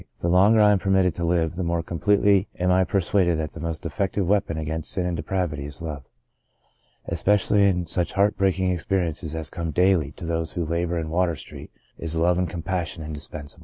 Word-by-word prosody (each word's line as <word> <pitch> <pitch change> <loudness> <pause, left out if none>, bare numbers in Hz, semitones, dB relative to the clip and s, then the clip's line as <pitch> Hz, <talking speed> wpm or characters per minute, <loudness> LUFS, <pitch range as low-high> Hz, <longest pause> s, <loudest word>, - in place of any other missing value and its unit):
The 85 - 0
longer 100 +5 +5
I 105 -1 +6
am 100 - +3
permitted 95 -2 +2
to 85 - -5
live, 85 -1 +1
the 90 +2 -3
more 85 -1 -1
completely 100 +3 +2
am 90 +1 +1
I 95 +1 +4
persuaded 95 -3 +1
that 80 -1 -3
the - - -10
most 80 0 -4
effective 95 +3 -1
weapon 95 -5 +1
against 80 0 -3
sin 90 - 0
and 90 -1 -1
depravity 80 -3 -2
is 75 - -8
Love. 75 -5 -6 1.0
Especially 105 0 +2
in 90 -2 +1
such 85 +2 -2
heart 100 +2 +2
breaking 95 -1 +1
experiences 85 -3 -2
as 80 -1 -3
come 85 -1 -4
daily 90 -2 +2
to 85 - -9
those 80 -1 -2
who 85 -2 -2
labour 85 +2 -1
in 80 -1 -3
Water 85 -1 +1
Street - - -9 0.3
is 85 -1 -4
love 85 +2 +2
and 90 - 0
compassion 85 -2 -3
indispensable. 75 -1 -6
85 Hz, 200 wpm, -24 LUFS, 80-95 Hz, 1.0 s, I